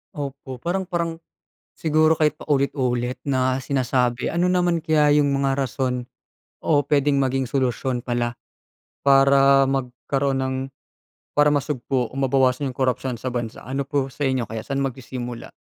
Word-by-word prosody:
Opo, 140 -2 -6
parang 185 +2 -1
parang 170 -2 -2 0.6
siguro 155 0 +3
kahit 155 -1 +3
paulit-ulit 130 -3 0
na 130 -1 +1
sinasabi, 125 -2 0
ano 175 +2 +1
naman 175 -2 +2
kaya 150 -2 +3
yung 145 - +2
mga 140 0 +1
rason 125 -1 -2 0.5
o 145 -3 +2
puwedeng 140 -1 +2
maging 135 0 0
solusyon 130 0 -1
pala 120 -1 -1 0.7
para 135 0 +5
magkaroon 135 +1 -1
ng 130 0 -1 0.8
para 145 0 +5
masugpo 130 -3 -1
o - - -18
mabawasan 135 0 +2
yung - - -23
korapsiyon 125 -2 -1
sa 130 - -2
bansa? 120 -2 -4
Ano 135 +2 -3
po 140 -1 -1
sa 145 +2 -2
inyo 130 -3 -1
kaya, 110 -1 -5
saan 140 0 -1
magsisimula? 125 -2 -5
135 Hz, 140 wpm, -23 LUFS, 125-145 Hz, 0.8 s, para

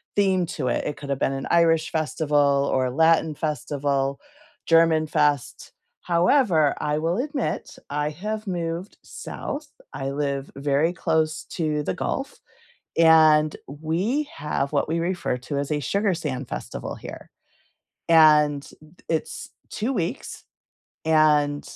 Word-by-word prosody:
theme 190 -3 +2
to 145 -5 -4
it. 120 - -1
It 150 - -3
could've 140 -2 -4
been 135 - +1
an 135 0 -4
Irish 165 -1 +3
festival 145 -3 +1
or 130 -1 +2
a 125 - -2
Latin 160 0 +3
festival, 140 -2 -2 0.5
Germanfest. 155 -4 +2 0.3
However, 175 - +3
I 150 0 -1
will 165 +4 0
admit, 280 -1 -3
I 150 +1 -1
have 215 +7 -5
moved 175 +1 -4
South, 290 0 -6 0.3
I 135 0 -4
live 140 -1 -2
very 145 +4 +1
close 160 -2 0
to 155 -3 -1
the 95 - -2
Gulf, - - -4 0.6
and 155 -2 +5
we 175 - -2
have 140 -1 -2
what 145 +1 0
we 165 +1 0
refer 175 -6 -1
to 140 +3 -4
as 140 +1 -3
a 150 - 0
Sugar 200 - 0
Sand 140 -6 -4
Festival, - - -6
here. - - -10 0.8
And 150 -3 +5
th 155 +3 -18
it's 160 -1 -3 0.2
2 235 +5 -2
weeks. 175 -8 -4 0.6
And, 150 -2 +3
155 Hz, 130 wpm, -24 LUFS, 145-170 Hz, 0.8 s, and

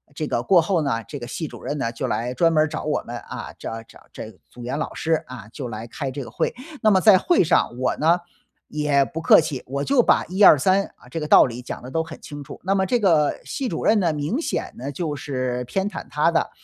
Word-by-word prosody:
这 155 - -3
个 120 - -1
过 175 +5 +5
后 170 0 0
呢， 115 -6 -1
这 145 - -7
个 120 - -7
系 160 +6 -4
主 - - -11
任 150 - -4
呢， 115 -4 -2
就 115 - -4
来 120 +2 -2
专 165 +6 +2
门 155 -1 +4
儿 - - 0
找 150 - -5
我 150 - 0
们， 120 +1 -6
啊， - - -8
找 115 0 -6
找 - - -18
这 110 - -8 0.2
组 120 - -12
员 130 +5 -3
老 - - -4
师 160 -1 0
啊， 120 -5 -9
就 130 0 -6
来 110 -1 -6
开 135 +4 -5
这 135 +1 -5
个 - - -11
会。 - - -1 0.3
那 220 - +4
么 190 -3 +4
在 210 -2 +7
会 340 - +3
上， 170 - +2
我 130 - 0
呢， 165 +3 +3 0.5
也 150 -2 +2
不 155 +4 -6
客 165 - +7
气， 150 -5 -4
我 140 +2 -3
就 275 - +3
把 - - +3
1、 190 +3 -3
2、 190 - +9
3， 190 +7 +2
啊， 125 - -19
这 165 - -3
个 150 - -4
道 - - +7
理 120 0 -6
讲 125 - -7
得 125 - -9
都 165 - 0
很 160 0 -9
清 145 -1 -8
楚。 140 - -11
那 195 +2 +1
么 190 -1 +2
这 245 +6 +1
个 165 -8 +2
系 270 - -4
主 - - -4
任 215 0 +4
呢， 170 -5 +1
明 150 - -2
显 335 - -3
呢， 130 +3 -5
就 150 0 -3
是 130 -3 -3
偏 195 +10 -2
袒 - - -7
他 - - +2
的。 - - 0
150 Hz, 275 characters per minute, -23 LUFS, 125-175 Hz, 0.5 s, 2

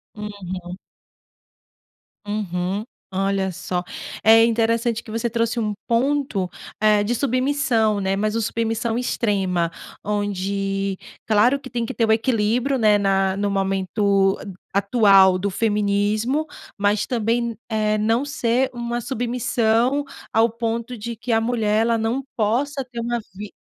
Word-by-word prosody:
Uhum. 185 -4 -7 1.5
Uhum. 195 0 -2 0.3
Olha 195 0 0
só. 180 +1 -3 0.4
É 225 +1 +7
interessante 230 0 +1
que 225 - -14
você 230 +2 -1
trouxe 230 +1 0
um 210 -2 -1
ponto, 240 -5 +1 0.3
eh, 210 -1 +4
de 235 +4 0
submissão, 255 -4 +1
né, 195 0 0
mas 215 +2 -1
o 230 - +1
submissão 225 +1 -1
extrema, 190 -8 0 0.3
onde 195 -1 -1 0.3
claro 235 +6 +3
que 260 - -11
tem 235 -1 -1
que - - -4
ter 225 -2 +1
o - - +3
equilíbrio, 230 +3 +1
né, 215 -3 +4
na 195 -1 +2
no 200 0 -1
momento, 195 0 +1 0.4
a - - +1
atual 200 -3 +5
do 200 +2 -1
feminismo, 210 +6 0 0.3
mas 205 +1 +1
também 230 -1 +1
n 235 -1 -3
eh, 215 -1 +1
não 225 +5 +1
ser 260 -3 0
uma 240 0 -3
submissão 240 +1 +1 0.3
ao 225 +1 +4
ponto 230 +1 -3
de 230 +2 -6
que 240 +2 -5
a 225 0 +3
mulher, 225 -2 +1
ela 230 0 +2
não 230 +5 -1
possa 260 +6 0
ter 240 -2 -8
uma 235 +1 -1 0.2
vi 205 +1 -7
220 Hz, 140 wpm, -22 LUFS, 200-235 Hz, 1.5 s, É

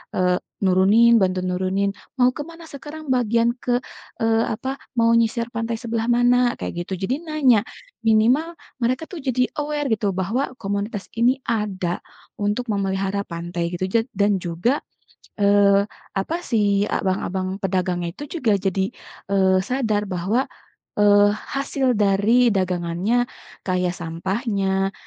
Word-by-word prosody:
eee, 180 -1 +2 0.3
nurunin 205 +5 +5
bantu 185 0 +1
nurunin, 185 +2 0 0.3
"Mau 250 -1 +5
ke - - -5
mana 335 0 -12
sekarang 295 +1 -9
bagian 235 -1 +2
ke, 245 -1 0 0.4
eee 225 0 +3
apa, 265 +5 -4 0.2
mau 230 0 +4
nyisir 230 0 +2
pantai 230 0 -2
sebelah 230 -1 -2
mana?" 245 0 +3
Kayak 175 0 -4
gitu - - -2
jadi 250 - 0
nanya, 275 -9 +3 0.5
minimal 245 +10 +3 0.3
mereka 255 +6 0
tuh 355 - -6
jadi 255 -2 +1 0.2
aware 295 -1 -2
gitu 210 -2 0
bahwa 220 +10 -1
komunitas 200 +1 -3
ini 245 +4 +3
ada, 195 -5 -1 0.4
untuk 205 +4 0
memelihara 195 0 -1
pantai 170 0 -4
gitu 185 - -1
ja 230 +4 +3
dan 200 0 +2
juga, 175 - 0 0.6
eee, 200 0 +5 0.3
apa 310 - -1
si 205 -3 +2
abang-abang 190 0 -1
pedagangnya 180 -2 -1
itu 290 - -7 0.2
juga 225 -6 +3
jadi, 190 0 0 0.5
eee, 190 -1 +4
sadar 220 -3 0
bahwa, 190 +9 0 0.5
eee, 205 0 +6 0.3
hasil 275 -2 0
dari 210 +5 +4
dagangannya, 185 +5 0 0.4
kayak 180 -1 0
sampahnya, 195 +3 -1
205 Hz, 130 wpm, -22 LUFS, 190-245 Hz, 0.6 s, eee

